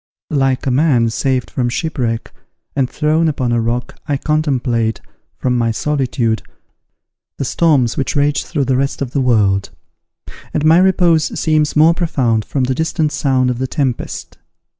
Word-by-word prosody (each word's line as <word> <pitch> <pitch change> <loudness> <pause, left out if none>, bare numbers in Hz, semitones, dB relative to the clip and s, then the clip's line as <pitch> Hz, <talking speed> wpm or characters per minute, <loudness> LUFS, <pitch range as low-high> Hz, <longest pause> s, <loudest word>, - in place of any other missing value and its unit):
Like 135 -3 +1
a 135 - +1
man 125 -4 +2
saved 130 +2 -1
from 125 -2 -1
shipwreck, 120 -5 -2 0.4
and 135 -3 +1
thrown 155 +2 +1
upon 135 -6 -1
a 120 -1 +1
rock, 120 +2 -3
I 145 - 0
contemplate, 130 -7 0 0.4
from 125 -1 0
my 115 -1 +1
solitude, 125 -3 -1 1.0
the 135 - -2
storms 140 -7 +2
which 135 - -1
rage 145 0 +1
through 145 -5 -2
the 130 0 +1
rest 140 +1 -1
of 125 - -6
the 140 - 0
world; 100 -6 +2 0.9
and 150 - 0
my 160 +2 +6
repose 175 -4 +2
seems 155 -1 +1
more 155 +2 +6
profound 130 -11 0
from 135 - -1
the 130 +1 0
distant 160 +1 -1
sound 130 -5 +1
of 125 - -4
the 130 - -1
tempest. 130 -4 -3
135 Hz, 160 wpm, -17 LUFS, 120-150 Hz, 1.0 s, my